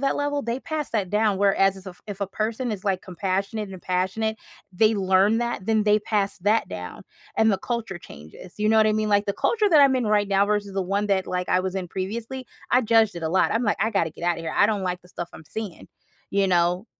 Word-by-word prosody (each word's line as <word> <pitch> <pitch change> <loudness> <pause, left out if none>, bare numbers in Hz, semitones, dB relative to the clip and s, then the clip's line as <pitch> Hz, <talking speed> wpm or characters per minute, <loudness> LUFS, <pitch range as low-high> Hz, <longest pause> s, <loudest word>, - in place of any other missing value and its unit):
that 275 0 +1
level, 290 0 -1
they 235 +3 -3
pass 310 -2 -4
that 205 -5 -1
down, 210 -2 +2
whereas 195 -1 +3
is 190 0 -13
if 180 -1 -10
if 205 -1 -7
a 200 - 0
person 225 +5 -2
is, 210 -1 -5
like, 190 -2 0
compassionate 195 +3 -3
and 185 -2 -9
passionate, 190 +5 -1 0.4
they 215 +3 +4
learn 195 +3 +3
that, 235 -5 -2
then 220 -1 +2
they 210 0 +4
pass 205 -2 -1
that 210 +4 +2
down, 90 -1 -7 0.4
and 220 0 +4
the 195 - +2
culture 230 -6 -4
changes. 80 - -13
You 210 0 +1
know 220 - +4
what 220 - +5
I 215 - +3
mean? 215 0 0
Like, 205 0 +3
the 200 - 0
culture 425 - +1
that 305 -3 +7
I'm 275 -2 +5
in 245 -4 -1
right 205 -1 +2
now 195 0 +3
versus 205 -1 -1
the 195 - 0
one 200 +3 -1
that, 190 -2 +1
like, 180 0 -3
I 180 - +3
was 190 0 -3
in 185 -2 -3
previously, 230 +8 -5 0.2
I 250 - +4
judged 225 -4 +3
it 170 - -6
a 160 - -1
lot. 185 - +2
I'm 225 +2 +1
like, 205 - +1
"I 220 - +2
gotta 170 -7 0
get 160 - -14
out 175 -1 +1
of - - -7
here. 160 - -3
I 205 - +5
don't 210 -3 -1
like 180 -1 -2
the 180 - -19
stuff 175 -1 -6
I'm 160 - -12
seeing," 215 -5 -7 0.4
you 200 0 +2
know? 175 +3 +2
205 Hz, 260 wpm, -24 LUFS, 185-220 Hz, 0.4 s, that